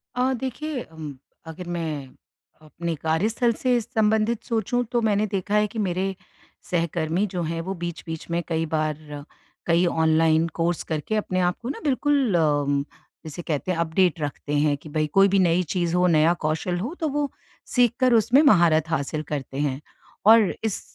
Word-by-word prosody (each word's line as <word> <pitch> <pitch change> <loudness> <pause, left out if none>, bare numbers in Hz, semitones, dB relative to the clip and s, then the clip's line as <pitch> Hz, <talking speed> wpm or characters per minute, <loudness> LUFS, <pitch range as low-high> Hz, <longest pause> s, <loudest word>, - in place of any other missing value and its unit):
अ, 255 +1 +1
देखिए 265 +2 -4
अम, 155 -4 -9 0.3
अगर 175 +2 -8
मैं 160 -5 -3 0.5
अपने 165 +2 -5
कार्यस्थल 210 - +1
से 250 -2 +3
संबंधित 220 0 +1
सोचूँ, 235 +2 0
तो 240 -2 +1
मैंने 215 -1 +2
देखा 200 +1 -2
है 210 0 +3
कि 225 - -7
मेरे 190 -1 -1 0.6
सहकर्मी 170 +2 0
जो 180 -1 -4
हैं, 165 +1 -3
वो 190 +3 -4
बीच-बीच 170 -2 -6
में 170 - 0
कई 165 -1 -1
बार 155 -1 0 0.7
कई 170 +1 +3
ऑनलाइन 160 -1 +3
कोर्स 170 0 +1
करके 160 +7 -3
अपने 185 -3 -1
आप 180 0 +1
को 235 - -5
ना 285 - -4
बिल्कुल 280 -5 +1
अम, 145 -3 +2 0.4
जिसे 160 +2 -6
कहते 165 +2 -2
हैं, 170 - -1
अपडेट 170 +1 +1
रखते 145 0 -4
हैं 145 0 +2
कि 155 - -13
भई, 155 0 0
कोई 195 +6 +5
भी 195 0 +2
नई 175 0 +3
चीज़ 175 -1 0
हो, 180 0 +3
नया 165 0 +4
कौशल 160 +3 -1
हो, 240 - -4
तो 320 - 0
वो 290 0 -1 0.5
सीखकर 245 0 +3
उसमें 235 +5 +5
महारत 170 - +4
हासिल 155 0 -2
करते 135 -1 -4
हैं 140 -1 -1 0.4
और 220 -2 +6
इस 220 -3 -2
175 Hz, 170 wpm, -24 LUFS, 160-215 Hz, 0.7 s, और